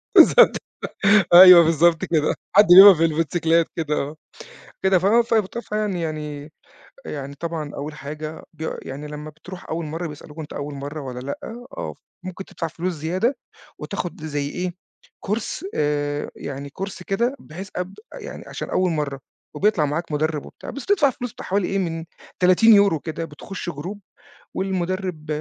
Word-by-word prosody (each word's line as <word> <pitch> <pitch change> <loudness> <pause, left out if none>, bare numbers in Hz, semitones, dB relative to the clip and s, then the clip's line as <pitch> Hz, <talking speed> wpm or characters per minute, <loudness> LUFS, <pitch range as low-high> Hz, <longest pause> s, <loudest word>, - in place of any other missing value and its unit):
بالضبط. 485 - +7 0.8
أيوه، 180 -2 +11
بالضبط 165 0 +3
كده. 155 -2 +1 0.2
حد 205 - +8
بيقف 190 0 +10
بالموتسيكلات 165 +1 +2
كده، 155 -2 -1
آه. 150 +2 -3 0.7
كده، 190 -1 +4
ف 185 - -1
ف 230 +2 +3 0.2
فيعني،-يعني 160 -9 -4 0.5
يعني 140 -1 -6
طبعًا، 160 -1 -5
أول 150 +2 -6
حاجة 155 +2 -7
بي 160 0 -5
يعني، 140 +3 -7
لمَّا 150 +1 -7
بتروح 175 +4 -12
أول 165 +1 -2
مرّة، 165 +3 -4
بيسألوك، 150 +1 -11
أنت 155 - -7
أول 145 0 -5
مرة 145 +3 -6
والّا 125 -3 -6
لأ، 140 +2 -5 0.4
آه، - - -5 0.3
فممكن 185 +1 -7
تدفع 165 - -5
فلوس 175 +3 -3
زيادة 180 - -1 0.4
وتاخد 175 -3 -5
زي 145 -2 -2
إيه، 180 +3 -3 0.5
course، 215 - -3
آآ، 145 0 -1
يعني 140 0 -7
course 195 -1 -5
كده، 235 +7 0
بحيث 185 +5 -9
أب 180 +1 -4 0.2
يعني، - - -8
عشان - - -6
أول 185 -1 +1
مرّة، 145 -4 -3 0.3
وبيطلع 200 -7 +2
معاك 155 +2 -3
مدرِّب 155 0 -1
وبتاع، - - -10
بس 280 - -8
تدفع 315 -9 +3
فلوس، 245 -2 -6
بتاع - - -10
حوالي 195 -1 0
إيه، 195 - -1
من 165 -3 -3 0.4
30€ 200 -2 +5
كده، 165 +1 -5
بتخُش 175 +4 -7
group، 175 +7 -7 0.6
والمدرِّب 185 -3 -3
165 Hz, 150 wpm, -22 LUFS, 150-190 Hz, 0.8 s, أيوه